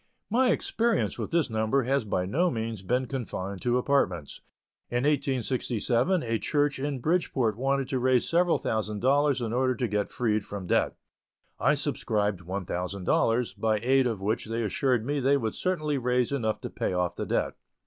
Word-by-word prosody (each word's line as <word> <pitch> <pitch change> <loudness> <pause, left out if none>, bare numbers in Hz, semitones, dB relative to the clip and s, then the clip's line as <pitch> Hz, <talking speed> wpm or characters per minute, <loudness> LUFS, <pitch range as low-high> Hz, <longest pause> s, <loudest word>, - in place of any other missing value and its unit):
My 250 +3 +4
experience 230 -1 0
with - - -3
this 170 -3 +2
number 110 +3 +1
has 135 0 0
by 90 -3 -1
no 170 - +1
means 115 - -3
been 125 +7 0
confined 100 -7 -5
to 120 0 +2
apartments. 95 - 0 0.5
In 120 +1 0
1867 135 - +1
a 115 -1 -1
church 145 - 0
in 140 0 -2
Bridgeport 130 - +1
wanted 135 +2 0
to 130 - 0
raise 130 -1 +2
several 175 0 +3
thousand 105 -1 -2
dollars 140 0 +3
in 115 -1 -2
order 130 +1 +2
to 120 +1 -1
get 105 -1 -1
freed 110 -4 0
from 100 -2 -6
debt. - - +1 0.6
I - - +3
subscribed 105 -3 -1
one 95 +2 -4
thousand 90 +2 -4
dollars, 115 +6 +2
by 110 -1 +1
aid 130 +1 +4
of 110 -5 -3
which 105 +3 -1
they 115 +1 -2
assured 120 +2 +1
me 145 +2 0
they 140 +2 +3
would 110 -5 -2
certainly 155 -6 -1
raise 125 0 +1
enough 115 -6 -1
to - - -6
pay - - -2
off 90 -1 0
the - - -4
debt. - - 0
125 Hz, 180 wpm, -27 LUFS, 110-140 Hz, 0.6 s, My